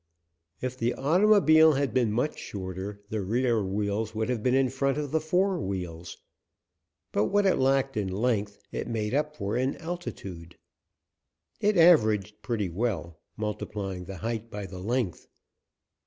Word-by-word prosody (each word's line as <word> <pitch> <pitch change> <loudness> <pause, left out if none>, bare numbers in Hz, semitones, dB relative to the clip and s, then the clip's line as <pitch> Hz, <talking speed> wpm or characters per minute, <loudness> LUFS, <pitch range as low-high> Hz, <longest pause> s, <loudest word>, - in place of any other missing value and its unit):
If 130 0 -4
the 120 +1 0
automobile 160 -1 +5
had 140 -3 0
been 120 -4 +2
much 125 +8 -1
shorter 95 +1 -6
the 110 -1 -1
rear 115 +2 +1
wheels 105 +3 -2
would 110 +2 -1
have 125 -3 -1
been 125 +3 +2
in 135 -2 +3
front 135 +1 0
of 145 -2 -3
the 160 0 +1
fore 180 +3 +1
wheels. 90 - -5 0.9
But 105 - +2
what 205 - +2
it 190 - +4
lacked 135 0 +2
in 105 -3 -1
length 105 -1 0
it - - -4
made 110 -2 -2
up 150 +1 -1
in 120 +7 -1
altitude. 100 - -7 1.0
It 210 -1 +2
averaged 110 - +4
pretty 110 -5 -1
well, 85 -4 -3 0.2
multiplying 105 -3 -4
the 95 +1 -7
height 115 +2 -4
by 105 -2 -5
the 95 0 -8
length. 110 -1 -2
115 Hz, 150 wpm, -28 LUFS, 100-135 Hz, 1.0 s, automobile